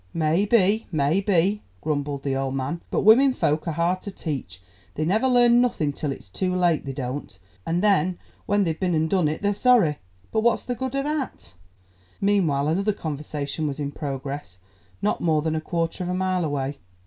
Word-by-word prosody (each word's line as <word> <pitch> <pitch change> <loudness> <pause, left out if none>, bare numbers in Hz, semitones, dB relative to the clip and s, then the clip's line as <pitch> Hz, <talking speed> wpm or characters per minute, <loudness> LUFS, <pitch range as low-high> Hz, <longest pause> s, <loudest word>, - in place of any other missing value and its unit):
"May 165 +4 +2
be, 210 0 +3
may 155 +4 +2
be," 195 +1 +2 0.2
grumbled 145 - -2
the 135 -1 -1
old 135 0 -2
man, 140 +6 -3
"but - - 0
women 260 +5 +7
folk 155 +3 0
are 165 - 0
hard 170 +3 0
to - - -6
teach; 150 - -5 0.4
they 155 - -1
never 215 +10 +2
learn 245 -1 +5
nothing 160 -12 0
till 145 0 -3
it's 130 -6 -8
too 180 - -2
late, 175 -5 +2
they - - -2
don't, 130 -5 -5 0.3
and 175 +3 0
then 185 -4 +3 0.3
when 205 0 +3
they've 160 -3 -2
been 180 -3 +1
and 160 0 +2
done 185 -5 +3
it 155 +6 -3
they're 205 0 +2
sorry, 205 - +3 0.3
but 220 - +1
what's 235 0 +2
the 250 - -2
good 260 +2 -4
o' 275 - 0
that?" 285 - -4 0.7
Meanwhile 175 -9 +2
another 200 +6 +1
conversation 150 -2 -4
was 145 0 -4
in 145 -1 -2
progress 140 - -5 0.5
not 210 - 0
more 155 -3 +2
than 160 0 0
a 155 - -1
quarter 165 +2 -2
of 180 - -4
a 180 - -1
mile 185 -1 0
away. 145 -2 -2
165 Hz, 195 wpm, -24 LUFS, 145-200 Hz, 0.7 s, women